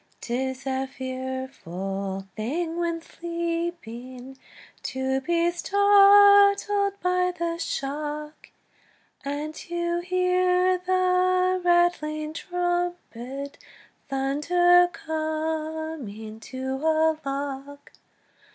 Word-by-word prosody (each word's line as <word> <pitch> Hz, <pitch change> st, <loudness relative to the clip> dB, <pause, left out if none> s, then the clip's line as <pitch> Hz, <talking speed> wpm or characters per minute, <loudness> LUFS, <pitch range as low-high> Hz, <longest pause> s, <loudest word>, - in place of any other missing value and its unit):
'Tis 260 Hz, +2 st, -3 dB
a 265 Hz, 0 st, -1 dB
fearful 245 Hz, -8 st, -5 dB
thing 320 Hz, +10 st, -2 dB
when 340 Hz, -1 st, -1 dB
sleeping 335 Hz, -8 st, -5 dB, 0.5 s
To 265 Hz, 0 st, -2 dB
be 340 Hz, +4 st, +1 dB
startled 405 Hz, +1 st, +5 dB
by 360 Hz, 0 st, +2 dB
the 335 Hz, -1 st, -2 dB
shock, 300 Hz, 0 st, -4 dB, 0.7 s
And 290 Hz, +2 st, -4 dB
to 345 Hz, +1 st, -3 dB
hear 365 Hz, 0 st, +2 dB
the 370 Hz, 0 st, +2 dB
rattling 310 Hz, -3 st, +1 dB
trumpet 350 Hz, -7 st, -3 dB, 0.5 s
Thunder, 350 Hz, +7 st, +3 dB
"Coming 315 Hz, -9 st, -4 dB
to 260 Hz, +3 st, -5 dB
a 320 Hz, 0 st, +2 dB
lock!" 280 Hz, +1 st, -5 dB
315 Hz, 75 wpm, -25 LUFS, 270-355 Hz, 0.7 s, startled